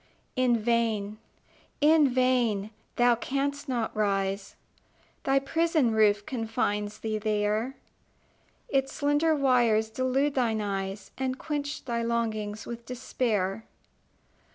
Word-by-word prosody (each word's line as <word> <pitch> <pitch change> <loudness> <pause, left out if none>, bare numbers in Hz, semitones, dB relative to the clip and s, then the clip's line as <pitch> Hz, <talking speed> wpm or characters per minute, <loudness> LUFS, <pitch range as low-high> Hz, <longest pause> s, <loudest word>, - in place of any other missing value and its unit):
In 255 -2 +3
vain 220 -2 0 0.6
in 300 -1 +5
vain! 245 -5 +1 0.2
Thou 240 0 +5
canst 280 +4 -2
not 235 -4 -1
rise: 195 -1 -1 0.7
Thy 270 0 +3
prison 310 -2 +2
roof 210 -2 +3
confines 210 -3 -2
thee 215 -1 -3
there; 215 +4 0 0.9
Its 270 -1 0
slender 295 +2 +2
wires 240 -6 +3
delude 260 +4 +1
thine 230 -5 +1
eyes, 195 -1 -4
And 260 -1 -1
quench 290 -1 -4
thy 235 -2 -1
longings 220 -2 -2
with 235 0 -7
despair. 225 -5 -1
235 Hz, 105 wpm, -28 LUFS, 215-265 Hz, 0.9 s, in